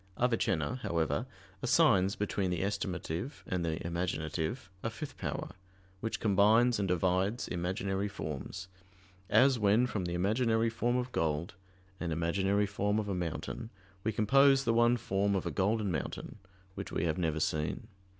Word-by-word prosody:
Avicenna, 115 - +1
however, 85 -6 -1 0.3
assigns 95 +2 +4
between 100 -2 -1
the 90 0 -1
estimative 95 - -3
and 90 -2 -2
the 80 -1 -1
imaginative, 85 - -2
a 115 - -1
fifth 135 +5 -7
power, - - -4 0.5
which 110 +2 -3
combines 110 +3 +4
and 100 - 0
divides 95 +5 +1
imaginary 95 +3 -1
forms: 95 0 -6 0.6
as 130 -2 +5
when 105 +4 +4
from 105 -7 -2
the 85 0 -2
imaginary 110 +4 +2
form 120 +2 0
of 125 0 -2
gold, 80 -2 -1 0.5
and 85 -2 -2
imaginary 95 +5 +1
form 100 +1 0
of 105 -2 -1
a - - 0
mountain, 90 +5 -4 0.3
we 110 - +1
compose 135 +6 +5
the 115 - +2
one 120 +1 +4
form 100 -2 0
of 95 - -1
a 85 - -1
golden 100 +4 +1
mountain, 85 +5 -4 0.3
which - - -6
we - - -1
have 85 +1 0
never 80 -3 0
seen. 80 +8 -1
100 Hz, 150 wpm, -32 LUFS, 85-115 Hz, 0.6 s, as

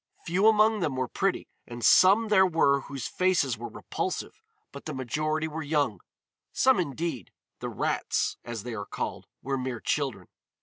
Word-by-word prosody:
Few 190 +4 +2
among 215 0 +4
them 150 -7 -1
were 130 -1 -1
pretty, 195 +7 -1 0.2
and 120 -1 -5
some 205 +4 +6
there 190 -3 +5
were 145 -5 +3
whose 135 -2 -6
faces 180 -9 +1
were 115 +2 -7
repulsive, - - -5 0.3
but 140 - -10
the 155 - -5
majority 155 +5 -1
were 160 +1 -5
young; 145 - 0 0.5
some 260 -4 +3
indeed, 150 - -3 0.3
the - - -4
rats, - - -1
as 120 -3 -6
they 120 -1 -5
are 100 -2 -5
called, - - -5 0.2
were 135 0 -1
mere 125 -2 -3
children. 135 - -2
145 Hz, 165 wpm, -27 LUFS, 125-185 Hz, 0.5 s, some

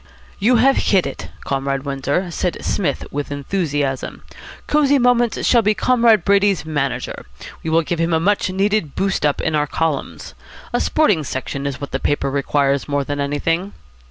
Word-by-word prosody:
"You 230 +5 +3
have 265 +4 +4
hit 190 -3 +2
it, 135 - -6 0.2
Comrade 135 0 -2
Windsor," 140 +6 -2
said 180 +1 -2
Psmith 155 -8 -1
with 145 0 -4
enthusiasm. 145 -3 -2 0.4
"Cosy 285 -1 +3
Moments 240 -2 +2
shall 235 - +5
be 210 0 +2
Comrade 230 -6 +3
Brady's 200 -4 +3
manager. 145 - -3 0.3
We 160 - -4
will 165 +1 +3
give 170 +1 -3
him 165 +1 +1
a 160 - +3
much 195 +2 +1
needed 195 -4 0
boost 195 -6 +1
up 145 - -1
in 160 - -1
our 150 -1 +1
columns. 160 -2 -3 0.4
A - - +1
sporting 210 - +2
section 140 +1 -4
is 135 -2 -4
what 140 - -6
the 135 - -2
paper 140 -1 0
requires 140 0 0
more 145 -1 0
than 145 +1 -4
anything." 165 +7 -1
160 Hz, 170 wpm, -19 LUFS, 140-200 Hz, 0.4 s, shall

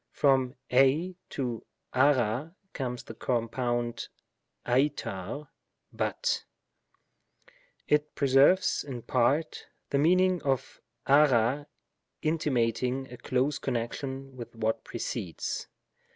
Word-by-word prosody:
From 135 -2 +2 0.2
av 130 - +7
and 160 +7 +2
uqu 130 +1 0 0.2
comes 125 -4 -4
the - - -9
compound 120 0 -1 0.6
avraQy 135 -1 -1 0.5
^^lut; - - -1 0.7
" - - -33
it 150 0 +1
preserves 140 +7 +4
in 125 -5 -7
part, 135 +6 +1 0.2
the 140 - +2
meaning 180 +3 +4
of 135 -3 -2 0.2
aga^ 140 -1 +4 0.6
intimating 130 -4 0
a - - -8
close 130 +5 0
connection 130 +2 -4
with 120 -2 -9
what 110 0 -1
precedes. 85 -3 -4
135 Hz, 95 wpm, -29 LUFS, 120-145 Hz, 0.7 s, av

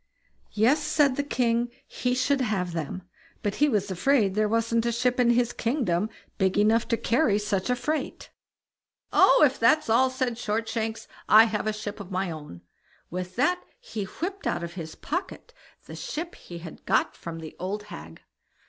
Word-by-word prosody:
Yes! 295 +9 +2
the 285 -2 +4
king 240 -4 +1
said - - -30
he 250 0 -1
should 265 +2 +1
have 190 -7 -1
them, 165 +3 -4 0.4
but 205 -1 -1
he 295 - +5
was 205 -5 0
afraid 205 +1 +2
there 215 +1 +1
wasn't 230 +1 +1
a - - +2
ship 250 +2 0
in 245 -1 +4
his 240 0 +2
kingdom 220 - 0 0.3
big 190 -1 +2
enough 220 +3 +3
to 230 - +1
carry 235 -4 +2
such 205 0 -1
a 250 - +3
freight. 305 +5 -3 0.8
"Oh! - - +6
if 270 -2 0
that's 250 +2 +3
all", 260 +3 +5
said 255 -2 -2
Shortshanks, 225 0 -2 0.2
"I 215 +1 +9
have 215 -1 -1
a - - +2
ship 210 0 -6
of 200 -3 -8
my 185 -1 -1
own." 150 - -9 0.5
With 180 +1 -5
that 355 +9 +2 0.2
he 225 - -5
whipped 380 - -5
out - - -1
of 170 0 -6
his 160 -3 -7
pocket 375 +8 -5 0.3
the - - -9
ship 335 +3 -5
he 175 - -10
had 170 -1 -10
got - - +2
from 165 -1 -7
the 160 -1 -9
old 195 +4 -3
hag. 80 - -11
225 Hz, 180 wpm, -26 LUFS, 195-255 Hz, 0.8 s, I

